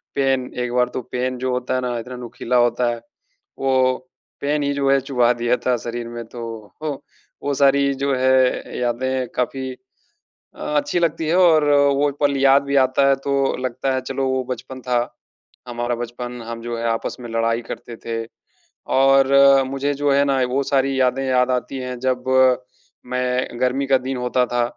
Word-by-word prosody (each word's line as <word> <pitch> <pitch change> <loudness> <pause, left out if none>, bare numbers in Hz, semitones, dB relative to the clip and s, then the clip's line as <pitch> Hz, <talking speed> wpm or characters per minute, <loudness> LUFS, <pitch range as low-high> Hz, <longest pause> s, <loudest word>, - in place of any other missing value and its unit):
Pen 135 -2 0
एक 125 - -3
बार 125 0 +2
तो 130 - -3
pen 125 0 -2
जो 130 0 -2
होता 125 0 -2
है 130 - 0
ना 125 -1 -2
इतना 125 +2 -8
नुकीला 125 +1 -2
होता 120 0 +2
है 120 -1 -3 0.6
वो 130 -1 +2 0.5
पेन 145 +1 0
ही 140 0 0
जो 140 -1 0
है 140 - +4
चुभा 125 -3 +2
दिया 120 +1 0
था 125 - +3
शरीर 120 +1 -5
में 120 0 -6
तो 120 - -9 1.0
वो 145 - 0
सारी 140 0 +3
जो 140 +1 -1
है 130 0 +2
यादें 125 +1 -1
काफ़ी 130 +1 -2 0.8
अ, - - -17 0.2
अच्छी 175 +4 0
लगती 165 -1 0
है 170 - +2
और 165 -4 +5
अ, 145 - +5 0.2
वो 145 +1 +1
पल 140 -1 +2
याद 135 0 +5
भी 140 0 -2
आता 135 +2 +2
है 135 - +4
तो 140 -2 +1
लगता 130 +1 -1
है 130 - -1
चलो 135 +1 -2
वो 130 0 0
बचपन 130 +1 -6
था। 125 -1 0 0.7
हमारा 120 0 -2
बचपन 120 +1 -6
हम 115 0 -6
जो 120 0 -4
है 115 - -3
आपस 115 +3 -2
में 120 - -7
लड़ाई 115 +1 0
करते 115 - -7
थे 115 0 -2 0.7
और 135 0 +4 0.4
मुझे 140 +2 -1
जो 145 0 +1
है 140 +1 +4
ना 135 -1 +1
वो 135 +2 0
सारी 135 0 +1
यादें 130 +1 +1
याद 130 -1 +2
आती 125 +2 -2
हैं, 125 0 -5
जब 130 -1 -1 0.8
मैं 125 -1 -2
गर्मी 130 +2 +1
का 135 - +4
दिन 130 0 -4
होता 125 0 +1
था 120 0 0
130 Hz, 185 wpm, -21 LUFS, 125-135 Hz, 1.0 s, और